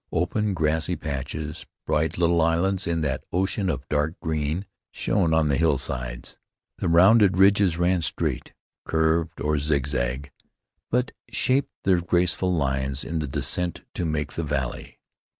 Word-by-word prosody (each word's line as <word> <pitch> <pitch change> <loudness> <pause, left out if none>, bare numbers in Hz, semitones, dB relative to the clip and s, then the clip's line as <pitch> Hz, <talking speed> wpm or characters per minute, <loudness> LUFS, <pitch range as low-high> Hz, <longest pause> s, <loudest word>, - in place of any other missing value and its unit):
Open 100 +4 0
grassy 80 +2 +1
patches, 75 +1 -5 0.2
bright 80 +1 0
little 85 -1 +3
islands 85 +4 +1
in 85 -1 0
that 70 -3 -2
ocean 95 +2 0
of 70 -5 -3
dark 75 +2 -1
green, 80 +3 -2 0.3
shone 90 -6 0
on 80 -1 +3
the 70 -2 +1
hillsides. 60 -6 -2 0.4
The - - 0
rounded 95 +3 +5
ridges 95 -3 +4
ran 90 0 +2
straight, 80 - -2 0.3
curved, 80 +1 0
or 75 0 0
zigzag, 70 -2 -1 0.6
but 125 +1 0 0.2
shaped 130 +2 +1
their 95 -3 +3
graceful 90 +1 +1
lines 70 -3 -1
in 80 0 -3
the 75 - -3
descent 85 +5 -1
to - - -3
make 75 -3 -2
the 85 - -3
valley. 70 -4 -4
80 Hz, 140 wpm, -25 LUFS, 75-90 Hz, 0.6 s, rounded